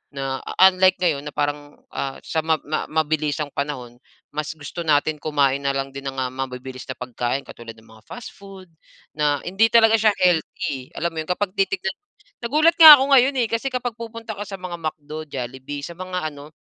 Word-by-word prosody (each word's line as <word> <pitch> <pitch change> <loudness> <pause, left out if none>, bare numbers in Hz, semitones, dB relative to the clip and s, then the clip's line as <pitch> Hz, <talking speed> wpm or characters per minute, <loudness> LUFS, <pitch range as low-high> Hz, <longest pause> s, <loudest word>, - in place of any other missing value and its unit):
na 135 -1 -3 0.3
unlike 185 0 +3
ngayon 150 -5 0
na 145 - -7
parang, 145 0 -3 0.2
ah, 135 -1 -4
sa 160 - -2
mab 160 0 0
ma 155 +1 -3
mabilisang 155 -1 -1
panahon. 125 -5 -5 0.3
Mas 150 +1 -4
gusto 145 +3 -9
natin 150 0 +1
kumain 140 -3 +1
na 140 -1 -1
lang 135 0 -3
din 140 0 -7
ng, 135 - -4
ah, 125 -1 -2
mabibilis 130 -1 -7
na 130 - -5
pagkain, 125 +2 -3
katulad 115 -1 -11
ng 110 - -19
mga 110 -1 -18
fast 245 - -9
food, 195 -3 -14 0.4
na 145 -2 0
hindi 195 +5 +2
talaga 225 -1 +5
siya 215 -1 +3
healthy, 160 -6 0
alam 170 +1 -2
mo 160 - -6
yun 155 - -5
na 180 - +1
kapag 205 -1 -2
titignan. 195 -1 0 0.5
Nagulat 305 +8 +2
nga 315 -2 +13
ako 275 0 -1
ngayon, 270 +1 +5
eh, - - -1
kasi 230 +4 -1
kapag 250 -1 -2
pupunta 230 -2 -7
ka 205 - -5
sa 195 - -6
mga 180 -2 -7
McDo, 155 0 -7
Jollibee, 130 +2 -6
sa 170 +3 -8
mga 180 -4 -4
ano, 145 +2 -13
155 Hz, 200 wpm, -22 LUFS, 140-190 Hz, 0.5 s, nga